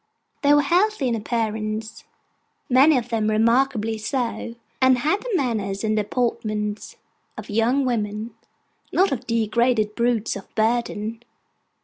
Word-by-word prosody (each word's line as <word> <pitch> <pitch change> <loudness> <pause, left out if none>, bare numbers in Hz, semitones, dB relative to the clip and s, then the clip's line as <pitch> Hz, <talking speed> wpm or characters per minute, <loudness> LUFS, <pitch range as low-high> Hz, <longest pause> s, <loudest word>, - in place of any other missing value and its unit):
They 285 - +4
were 290 - +4
healthy 360 0 +2
in - - 0
appearance, 220 -1 -3 0.7
many 270 +4 +6
of 245 -1 -3
them 220 -2 0
remarkably 225 0 +2
so, 235 0 -3 0.3
and 260 -1 +5
had 310 +11 0
the - - -6
manners 215 - -1
and 215 0 +1
deportment 215 -1 -2 0.4
of 215 -1 -8
young 240 +6 +2
women: 215 -2 -2 0.6
not 385 +2 +3
of 250 -2 -4
degraded 230 -1 +1
brutes 235 -1 0
of 200 - -8
burden. 225 0 -1
230 Hz, 125 wpm, -23 LUFS, 215-255 Hz, 0.7 s, many